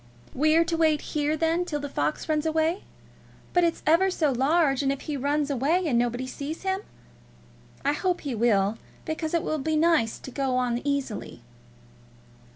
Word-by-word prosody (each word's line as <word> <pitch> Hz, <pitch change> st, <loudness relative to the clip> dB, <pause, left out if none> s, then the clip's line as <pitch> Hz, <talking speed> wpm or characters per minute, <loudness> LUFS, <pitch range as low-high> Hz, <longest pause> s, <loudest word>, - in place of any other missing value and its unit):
"We're 310 Hz, +4 st, +4 dB
to 335 Hz, 0 st, -1 dB
wait 315 Hz, -2 st, +3 dB
here, 300 Hz, +1 st, 0 dB
then, 330 Hz, +2 st, +1 dB
till 300 Hz, -4 st, -3 dB
the 285 Hz, -, -4 dB
fox 150 Hz, -, -2 dB
runs 310 Hz, 0 st, 0 dB
away? 320 Hz, +4 st, 0 dB, 0.7 s
But 355 Hz, -, +4 dB
it's 335 Hz, -1 st, 0 dB
ever 335 Hz, +5 st, +4 dB
so 315 Hz, -6 st, +1 dB
large, 275 Hz, +2 st, +2 dB
and 275 Hz, -1 st, +1 dB
if 275 Hz, -, -4 dB
he 300 Hz, -, -4 dB
runs 285 Hz, +2 st, 0 dB
away, 300 Hz, +8 st, +1 dB
and 250 Hz, -7 st, +2 dB
nobody 245 Hz, +1 st, -1 dB
sees 285 Hz, +6 st, -6 dB
him? 380 Hz, 0 st, 0 dB, 1.1 s
I 285 Hz, -, +3 dB
hope 360 Hz, +3 st, -1 dB
he 280 Hz, -4 st, -3 dB
will, 220 Hz, -2 st, +2 dB, 0.3 s
because 315 Hz, +1 st, -2 dB
it 335 Hz, -, +1 dB
will 310 Hz, -, -1 dB
be 315 Hz, +3 st, -1 dB
nice 310 Hz, -8 st, +2 dB
to 265 Hz, -, -10 dB
go 265 Hz, -1 st, -1 dB
on 245 Hz, -1 st, 0 dB
easily." 270 Hz, -, -3 dB
295 Hz, 175 wpm, -26 LUFS, 265-325 Hz, 1.1 s, We're